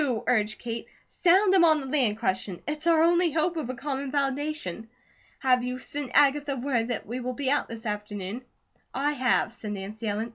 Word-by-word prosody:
urged 215 -3 +1
Kate. 230 -1 -5 0.2
"Sound 375 +2 +3
him 375 -3 +6
on 315 -2 +5
the 275 - -6
land 260 -6 +1
question. 190 -3 -1
It's 300 +2 -3
our 325 -1 +5
only 345 0 +4
hope 330 +2 +1
of 310 -7 -3
a 255 - -3
common 275 +1 -4
foundation. 275 - -2 0.5
Have 250 -2 +2
you 250 0 -3
send 280 +1 -6
Agatha 285 0 +4
word 245 -3 -1
that 240 -3 -3
we 240 +4 -4
will 255 0 -3
be 270 +1 -1
out 290 - +1
this 230 0 -8
afternoon?" 210 +1 -4 0.5
"I 285 +3 +1
have," 255 -5 +1
said 215 -3 -6
Nancy 205 +3 -6
Ellen. 215 +3 -2
255 Hz, 190 wpm, -27 LUFS, 225-295 Hz, 0.5 s, him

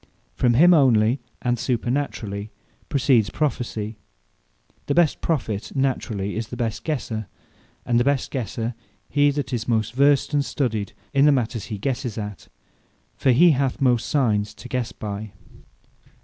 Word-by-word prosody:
From 120 -2 +2
him 175 +7 +7
onely, 125 -4 +4 0.2
and 120 -1 0
supernaturally, 120 -5 -2 0.4
proceeds 125 -6 +3
Prophecy. 115 -6 -2 0.9
The 140 - 0
best 170 -4 +3
Prophet 115 -10 -2
naturally 120 -7 -1
is 110 0 -3
the - - -7
best 115 -2 -2
guesser; 115 - -3 0.6
and 120 -1 +2
the - - +3
best 140 0 0
guesser, 120 -1 -3 0.4
he 145 0 +4
that 140 -2 -3
is 115 -3 -2
most 110 -2 0
versed 140 +2 +3
and 145 -1 +3
studied 110 -8 -2 0.2
in 140 0 +5
the 150 - +6
matters 120 -4 -1
he 110 - -5
guesses 125 0 -3
at: 105 -2 -6 0.7
for - - +1
he 165 +8 +6
hath 135 -2 0
most 125 -4 +2
Signes 105 -7 +1
to 125 - -10
guesse 125 -2 -2
by. 105 -2 -6
120 Hz, 150 wpm, -23 LUFS, 110-140 Hz, 0.9 s, him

